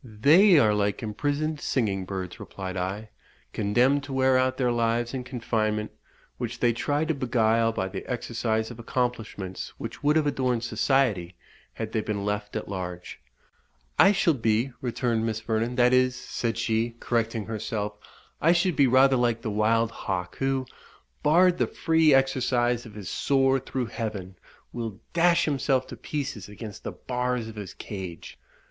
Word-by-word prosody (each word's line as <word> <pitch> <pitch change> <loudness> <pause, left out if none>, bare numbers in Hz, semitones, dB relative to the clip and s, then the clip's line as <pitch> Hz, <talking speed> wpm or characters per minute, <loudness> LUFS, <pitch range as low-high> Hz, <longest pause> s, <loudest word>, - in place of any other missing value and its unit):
"They 150 - +5
are 110 -7 +5
like 105 +2 0
imprisoned 145 +7 -2
singing 100 -7 0
birds," 95 -1 -5
replied 95 -1 -6
I, 95 +4 -4 0.4
"condemned 125 +7 +2
to 140 - -7
wear 130 0 +3
out 130 0 +2
their 125 -2 +1
lives 120 +1 0
in 130 -2 -3
confinement, 110 -4 -1 0.5
which - - -4
they 120 -1 +3
try 145 +6 0
to 160 - 0
beguile 115 -4 +2
by 95 -4 -2
the 95 0 -6
exercise 115 -2 -1
of 120 - -10
accomplishments 115 -6 -3
which - - -7
would 150 +1 +3
have 155 -1 +3
adorned 130 -4 0
society 115 -9 +1 0.4
had 110 -1 -5
they 110 - 0
been 105 -2 -3
left 105 0 -3
at 110 - -3
large." 90 -7 -6 0.8
"I 195 - +8
shall 185 -4 +3
be," 115 0 +1
returned 120 -2 -1
Miss 110 -1 -1
Vernon 115 +2 -1
"that 125 0 +4
is," 130 0 +3
said 115 -2 -3
she, 115 0 0
correcting 115 -2 -1
herself 105 -1 -3 0.5
"I 165 +2 +5
should 175 -1 +1
be 140 - +5
rather 130 +1 +5
like 120 -2 +1
the 110 - -2
wild 110 +2 +2
hawk, 90 -2 -4
who, 135 -1 0 0.6
barred 175 +4 +4
the - - +2
free 160 -2 +3
exercise 125 -3 +2
of 105 - -13
his 100 -4 -7
soar 135 -1 +2
through 130 -1 -3
heaven, 105 -6 -5 0.4
will 115 -4 -5
dash 170 0 +4
himself 135 -3 +1
to - - -7
pieces 130 -4 -5
against 105 0 -9
the - - -4
bars 125 -2 -2
of 110 - -9
his 100 -3 -7
cage. 95 -5 -8
120 Hz, 165 wpm, -26 LUFS, 105-135 Hz, 0.8 s, I